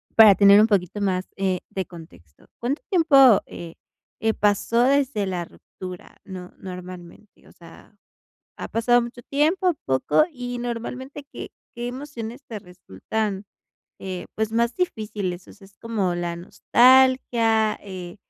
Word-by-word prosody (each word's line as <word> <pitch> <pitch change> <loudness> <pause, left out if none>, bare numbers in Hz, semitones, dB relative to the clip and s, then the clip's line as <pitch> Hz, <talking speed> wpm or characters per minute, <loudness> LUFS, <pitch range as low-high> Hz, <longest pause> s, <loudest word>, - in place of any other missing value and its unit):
para 215 -3 +9
tener 200 +1 +7
un 215 - +6
poquito 200 -2 0
más, 190 -2 -1
eh, 190 -2 -1
de 190 -1 -4
contexto. 160 - -15
¿Cuánto 265 - -2
tiempo, 275 - +6
eh 165 -1 -10 0.4
eh, 220 0 +1
pasó 205 +3 +1
desde 260 -6 +1
la 180 -2 -3
ruptura, 180 +1 -11
no 185 -2 -9
normalmente? 180 +1 -11
O - - -17
sea, 170 +5 -17 0.6
¿ha - - -5
pasado 240 +2 +2
mucho 240 +1 -7
tiempo, 330 +7 +1
poco? 130 - +2
Y, 245 -2 -6
normalmente, 250 +4 -6
¿qué - - -8 0.3
qué 240 0 -4
emociones 250 -1 -7
te 220 -3 -6
resultan, 190 - -5 0.6
eh, 185 -2 -6
pues 220 0 -2
más 235 +1 +1
difíciles? 210 - -3
O - - -14
sea, 200 -2 -17
¿es 195 +1 -24
como 205 -6 -1
la 175 -1 -3
nostalgia, 235 +1 +3
eh 185 -2 -9
215 Hz, 140 wpm, -23 LUFS, 185-245 Hz, 0.6 s, para